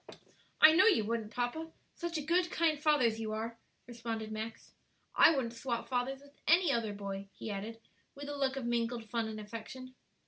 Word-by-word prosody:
"I 310 - +11
know 375 +6 +6
you 295 - +4
wouldn't, 225 -1 -2
papa; 250 +8 -3 0.2
such 340 -1 -4
a 300 - -3
good, 345 +3 +2
kind 315 -4 +1
father 300 -5 +4
as 225 -1 +1
you 215 -1 -3
are," 230 +1 -4 0.3
responded 230 -2 -5
Max. 220 +1 -6 0.4
"I - - +8
wouldn't 240 -4 -1
swap 235 0 -3
fathers 260 +1 -1
with 285 0 -18
any 340 -1 +5
other 230 -4 0
boy," 200 -1 -6
he 220 - -6
added, 215 +3 -5 0.4
with 285 0 -8
a 290 - -4
look 270 -1 0
of 270 -3 -4
mingled 235 -1 -1
fun 230 -2 0
and 215 -1 -6
affection. 230 +4 -8
240 Hz, 195 wpm, -33 LUFS, 225-285 Hz, 0.4 s, I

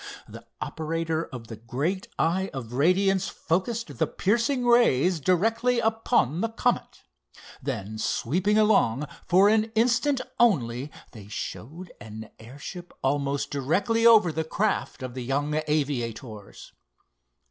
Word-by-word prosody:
The - - -12
operator 165 0 -2
of 125 -3 -9
the 115 -1 -9
great 140 - -3
eye 190 +4 +1
of 120 -3 -6
radiance 190 +7 +2
focused 215 +8 -2
the - - +2
piercing 240 +5 0
rays 185 - +4
directly 225 - +2
upon 220 - +1
the 225 - 0
Comet. 240 +2 -1 0.6
Then, 110 -6 -4
sweeping 185 - 0
along, 195 - +3 0.2
for 190 +3 +5
an 215 +1 +4
instant 250 +4 +2 0.2
only 135 - +2 0.2
they 105 -4 -12
showed 155 - -7
an 110 0 -9
airship 145 +9 -9
almost 140 +1 0
directly 190 - 0
over 215 -7 +6
the 160 +1 -2
craft 195 -4 -2
of 130 -1 -5
the 130 0 -5
young 145 +4 -1
aviators. 120 -8 -3
165 Hz, 125 wpm, -26 LUFS, 130-215 Hz, 0.6 s, over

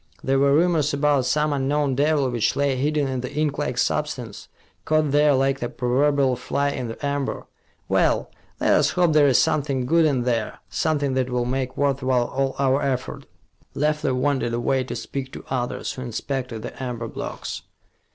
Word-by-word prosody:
There 135 0 +2
were 140 0 +4
rumors 160 -3 +2
about 140 -3 +2
some 150 +3 +1
unknown 140 0 0
devil 145 +1 +2
which 120 -3 0
lay 140 -1 +1
hidden 145 +2 0
in 130 -1 -2
the 125 - -5
inklike 145 -3 -2
substance, 125 -7 -2 0.4
caught 155 -2 +1
there 145 0 +4
like 135 +1 +1
the 120 - -3
proverbial 135 +1 +1
fly 140 +3 -1
in 125 -3 -4
the 115 +5 -6
amber. 140 -1 -2 0.4
Well, - - +1 0.3
let - - +3
us - - +4
hope 175 -3 +2
there 150 -2 +5
is 130 - +4
something 135 -4 +1
good 165 +4 +4
in 135 -5 +1
there, 115 -3 -1
something 145 -4 0
that 130 -1 0
will 125 -1 0
make 130 0 -2
worth 140 -1 +1
while 130 -2 +2
all 135 +1 -2
our 135 0 +2
effort." 130 -2 -3 0.5
Leffler 150 -2 0
wandered 130 -3 0
away, 130 +2 +1
to - - -5
speak 135 -1 -5
to - - -9
others 125 -2 -2
who 130 - -8
inspected 125 -1 -4
the - - -8
amber 120 -3 -4
blocks. - - -6
135 Hz, 180 wpm, -23 LUFS, 125-145 Hz, 0.5 s, there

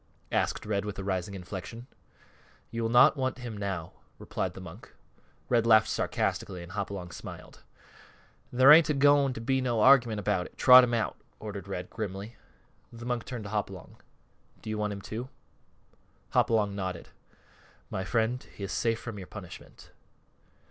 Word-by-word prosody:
asked - - 0
Red 105 -1 -1
with 105 -1 -6
a 95 - -5
rising 95 0 -2
inflection. 95 +5 -7 0.9
"You 115 - -3
will 115 - 0
not 120 +5 +6
want 130 -2 -2
him 120 -3 -7
now," 95 -5 -4 0.2
replied - - -4
the - - -8
monk. 90 -3 -11 0.6
Red 115 -2 +2
laughed 110 -1 +6
sarcastically 90 -2 -2
and 85 - -11
Hopalong 100 -3 -5
smiled. - - -10 0.9
"There 130 +3 +7
ain't 155 +1 +8
a 150 - +2
going 140 -1 +4
to 115 - -7
be 130 +3 +1
no 120 -3 0
argument 120 -4 +5
about 90 -2 -1
it. - - -22
Trot 125 0 +9
him 120 -1 +1
out," 115 - -2 0.2
ordered 100 -2 -7
Red, 90 -2 -5
grimly. 105 +1 -6 0.6
The 115 0 -10
monk 120 -1 -2
turned 120 -4 -6
to 100 - -8
Hopalong. 100 -4 -5 0.7
"Do 110 - -5
you, - - -2
too, - - -4
want 105 -2 -3
him?" 120 +4 -5 1.0
Hopalong 105 -3 +2
nodded. 95 -3 -5 0.8
"My 95 - -2
friends, 115 +4 -1
he 100 - -11
is 95 - -4
safe 115 -1 0
from 115 -4 -7
your 95 - -9
punishment." 100 -5 -11
110 Hz, 165 wpm, -29 LUFS, 100-120 Hz, 1.0 s, Trot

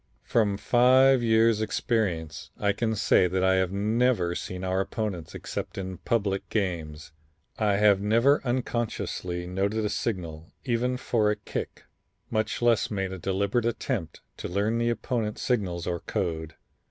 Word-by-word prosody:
From 105 -4 +1
five 130 +3 +5
years' 110 -1 +3
experience, 85 -8 -1
I 100 -1 +2
can 110 +2 -1
say 95 -3 +4
that 95 +1 -1
I 95 0 +4
have 95 -1 +1
never 105 -2 +1
seen 90 +1 -5
our 95 +1 0
opponents 95 -6 -4
except - - -5
in 95 -1 -5
public 100 -4 -1
games. 80 -8 -3 0.5
I 105 -2 +2
have 100 -1 +4
never 115 +8 +3
unconsciously 120 -8 -2
noted 100 +4 -1
a - - 0
signal 85 -8 -4
even 125 0 0
for 110 -4 +1
a 105 - +1
kick, 105 - -6 0.5
much 110 +1 -1
less 120 -2 +3
made 95 -3 -2
a 95 - -6
deliberate 100 +6 0
attempt 115 - -3 0.2
to - - -5
learn 105 +5 0
the 120 0 +1
opponents' 115 -2 -2
signals 95 -9 -1
or 85 -1 -2
code. 80 -3 -3
105 Hz, 150 wpm, -27 LUFS, 90-115 Hz, 0.5 s, five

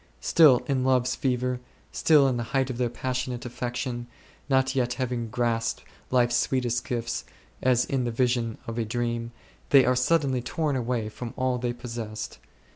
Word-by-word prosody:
Still 140 - +6
in 135 -2 0
love's 130 -1 +2
fever, 125 -1 -1 0.3
still 150 -4 +5
at 130 - +1
the 120 - -1 0.2
height 135 -1 +1
of 120 - -6
their 125 -1 +1
passionate 125 +1 -3
affection, 120 0 -4 0.4
not 130 -1 +3
yet 125 -2 0
having 125 -3 -2
grasped 115 -1 -1 0.3
life's 120 -1 +3
sweetest 120 -2 0
gifts, 115 -1 -2 0.4
as 125 -1 +3
in 135 -2 -1
the 120 - -1
vision 120 -1 0
of 115 +1 -4
a - - +1
dream, 115 +1 -2 0.4
they 135 -2 +7
are 125 +1 +3
suddenly 135 -1 +2
torn 150 +3 -1
away 120 -3 -1
from 115 +2 -7
all 130 -1 0
they 120 0 -1
possessed. 115 -3 -6
125 Hz, 165 wpm, -26 LUFS, 120-130 Hz, 0.4 s, they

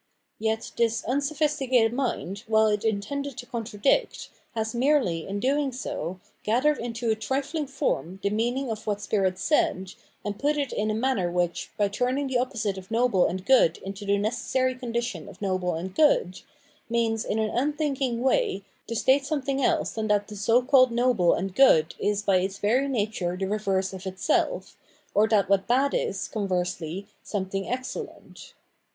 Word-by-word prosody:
Yet 220 +1 -1
this 230 -1 +1
unsophisticated 275 -3 +1
mind, 235 -6 -2
while 220 0 +4
it 210 -1 +1
intended 230 +6 -2
to 245 - -6
contradict, 230 - -1 0.3
has 220 0 -2
merely, 240 - +1
in 200 +1 -3
doing 275 +4 +1
so, 185 -8 -5 0.2
gathered 260 +8 +2
into 230 -1 -2
a - - +2
trifling 275 +7 -2
form 260 - -2
the 200 - +1
mean 235 +4 0
ing 270 -3 -2
of 220 0 -6
what 205 -1 0
spirit 195 -3 0
said, 190 - +1 0.3
and 205 0 -4
put 295 +1 +1
it 280 -3 -2
in 215 +1 -1
a 215 - 0
manner 225 -6 0
which, 175 -1 -1
by 205 -2 +3
turning 250 +7 -1
the 260 -2 0
opposite 220 -6 -2
of 185 - -14
noble 230 -5 +3
and 185 +2 -4
good 240 -11 +5
into 195 +1 -6
the 200 0 +2
necessary 245 +4 0
condition 235 -8 -4
of - - -14
noble 185 -3 -1
and 180 +3 -5
good, 195 - +3 0.5
means, 230 -1 +1
in 215 - -2
an 220 -1 0
unthinking 275 -3 -1
way, 265 - +1 0.2
to 230 - -4
state 265 +5 +3
something 275 -2 -1
else - - +1
than 220 -1 -3
that 205 -1 +1
the 210 - -9
so 230 +5 +3
called 255 0 +5
noble 240 -7 +3
and 190 +1 -3
good 165 -11 +5
is 205 0 0
by 195 -2 +3
its 190 +2 -1
very 245 +7 +2
nature 205 -8 -1
the 190 - -1
reverse 195 -2 -1
of 190 0 -7
itself, 190 - -1 0.4
or 215 +2 +4
that 210 -3 +3
what 200 0 +4
is 190 - -22
bad 265 +4 +2
is, - - -1
conversely, 185 -3 -2 0.2
something 195 -1 -3
excellent. 255 +1 -6
220 Hz, 175 wpm, -26 LUFS, 195-260 Hz, 0.5 s, good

